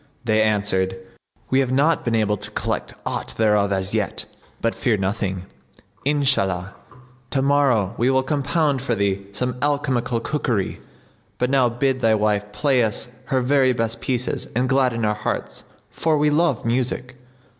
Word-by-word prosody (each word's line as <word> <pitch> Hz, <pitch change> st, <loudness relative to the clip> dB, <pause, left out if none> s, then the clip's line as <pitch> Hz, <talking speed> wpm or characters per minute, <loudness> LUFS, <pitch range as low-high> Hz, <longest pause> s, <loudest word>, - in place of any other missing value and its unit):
They 110 Hz, -1 st, +3 dB
answered, 100 Hz, -3 st, +1 dB, 0.5 s
"We 130 Hz, -, +4 dB
have 130 Hz, -2 st, +1 dB
not 150 Hz, +5 st, +2 dB
been 115 Hz, -1 st, 0 dB
able 105 Hz, -2 st, +2 dB
to -, -, -7 dB
collect -, -, -3 dB
aught -, -, -3 dB
thereof 105 Hz, -2 st, +3 dB
as 95 Hz, 0 st, 0 dB
yet; -, -, -1 dB, 0.3 s
but 115 Hz, -, 0 dB
fear 115 Hz, -4 st, +1 dB
nothing: 95 Hz, -1 st, -2 dB, 0.6 s
Inshallah, 100 Hz, -11 st, +1 dB, 0.6 s
tomorrow 135 Hz, -7 st, +2 dB
we 120 Hz, +3 st, +3 dB
will 130 Hz, 0 st, +3 dB
compound 145 Hz, 0 st, 0 dB
for 125 Hz, -3 st, -1 dB
thee 100 Hz, -1 st, -1 dB
some 125 Hz, +4 st, -2 dB
alchemical 130 Hz, -4 st, 0 dB
cookery. 115 Hz, -6 st, -2 dB, 0.6 s
But 125 Hz, +1 st, 0 dB
now 130 Hz, -3 st, +4 dB
bid 130 Hz, +2 st, 0 dB
thy 110 Hz, -2 st, +4 dB
wife 105 Hz, -1 st, 0 dB
play 135 Hz, -2 st, +2 dB
us 110 Hz, +2 st, -2 dB, 0.2 s
her 130 Hz, -2 st, +1 dB
very 130 Hz, 0 st, +3 dB
best 115 Hz, -1 st, -2 dB
pieces 125 Hz, -1 st, -1 dB
and 125 Hz, +2 st, +1 dB
gladden 125 Hz, -4 st, +2 dB
our 105 Hz, -, +2 dB
hearts 105 Hz, -, -4 dB, 0.3 s
for 160 Hz, -2 st, +1 dB
we 150 Hz, 0 st, +3 dB
love 150 Hz, -6 st, +1 dB
music." 125 Hz, +1 st, -1 dB
120 Hz, 155 wpm, -22 LUFS, 105-135 Hz, 0.6 s, We